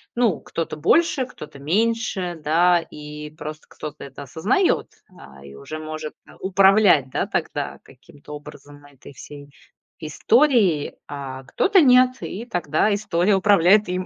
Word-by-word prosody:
ну, 235 -7 +1
кто-то 165 -2 -5
больше, 270 - +2
кто-то 150 - -12
меньше, 190 +1 -1
да. 175 +3 +3
И 150 0 -9
просто 155 0 -9
кто-то 150 0 -9
это 140 +1 -10
осознаёт, 180 - 0 0.3
а, 70 0 -15
и 70 0 -12
уже 115 - -8
может, 155 0 -7
а, - - -16
управлять, 190 -6 +4
да, - - -2
тогда - - -3
каким-то 145 +1 -15
образом 145 0 -12
этой 140 0 -15
всей 145 +1 -12 0.5
историей, 200 - +2
а 135 -2 -7
кто-то 375 - +2
нет. 255 -2 +5
И 220 +5 -6
тогда 175 - 0
история 200 -1 +1
управляет 200 +1 +4
им. 180 0 -2
165 Hz, 135 wpm, -22 LUFS, 145-210 Hz, 0.5 s, нет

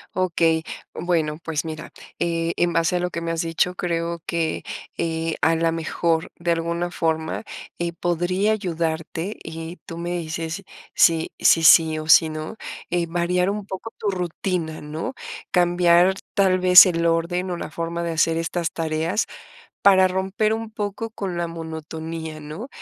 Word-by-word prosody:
Okey. 165 -3 +2 0.3
Bueno, 160 -3 -1
pues 160 -1 -2
mira, 155 -1 -6 0.3
eh, 170 0 0
en 175 0 +2
base 165 +1 +1
a - - -1
lo 180 0 -1
que 170 - -4
me 165 0 -3
has 165 -1 -1
dicho, 165 +2 0
creo 170 -1 -2
que, 165 -2 -1 0.3
eh, 165 -1 -1
a 165 +1 +4
lo 165 0 +1
mejor 165 0 -1
de 170 0 -1
alguna 170 +1 -1
forma, 160 +3 -1 0.4
eh, 170 -1 -2
podría 175 +4 +1
ayudarte 165 -1 -2
y 165 +2 -7
tú 165 - -7
me 170 +1 -4
dices 165 +1 -3 0.3
si 165 -1 +4
si 165 - +5
sí 160 0 +7
o 155 0 -5
si 160 0 +7
no, 155 +7 -6 0.3
eh, 175 -1 +1
variar 175 +2 +1
un 205 0 -3
poco 200 +4 -7
tu 205 - -1
rutina, 175 -2 -3
¿no?, 150 - -5 0.4
cambiar 175 0 +4 0.2
tal 190 -3 +3
vez 180 +1 +10
el 170 -2 +1
orden 170 +2 0
o 175 - -2
la - - -6
forma 170 0 -3
de 170 - -2
hacer 165 0 +2
estas 165 0 -2
tareas 160 +5 -1 0.6
para 190 -2 +6
romper 190 +3 0
un 225 0 -4
poco 215 +1 -4
con 195 -5 -4
la 170 0 -1
monotonía, 160 -1 -6
¿no?, 155 - -7
170 Hz, 165 wpm, -23 LUFS, 165-180 Hz, 0.6 s, vez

